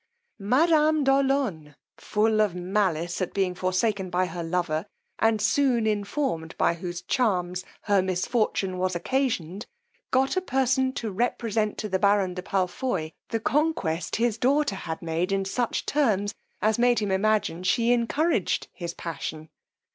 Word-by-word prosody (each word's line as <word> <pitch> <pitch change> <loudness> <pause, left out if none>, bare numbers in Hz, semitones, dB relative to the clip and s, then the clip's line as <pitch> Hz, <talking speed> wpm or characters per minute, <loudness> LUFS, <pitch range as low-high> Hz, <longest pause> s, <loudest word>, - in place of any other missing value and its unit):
Madame 305 +7 +3
de 270 - +4
Olonne, 265 - 0 0.2
full 215 0 +1
of 205 -5 +1
malice 180 -2 -1
at 185 - -3
being 190 -2 +1
forsaken 185 +2 0
by 180 +1 +1
her 170 -1 -5
lover, 165 0 -1 0.3
and 225 -1 +3
soon 235 +1 +2
informed 205 - -2
by - - +3
whose 175 +1 -6
charms 180 -6 0 0.2
her 200 -2 +3
misfortune 190 0 -1
was 185 0 0
occasioned, 205 - -1 0.4
got 265 +4 +2
a 370 - +1
person 265 -4 +1
to 225 -4 -4
represent 220 0 -1
to 215 - -3
the 190 -2 0
baron 200 -2 +3
de 180 - -5
Palfoy 185 -2 -1 0.2
the 225 - -1
conquest 220 - 0
his 230 -1 0
daughter 280 0 +2
had 165 -4 -5
made 165 +3 -1
in 195 0 0
such 235 +4 -1
terms, 210 -8 +1 0.3
as 215 +1 +2
made 245 0 +4
him 205 -2 0
imagine 205 -3 +1
she 230 +6 +2
encouraged 245 - 0
his 170 -2 -6
passion. 160 -1 -6
205 Hz, 145 wpm, -26 LUFS, 180-245 Hz, 0.4 s, de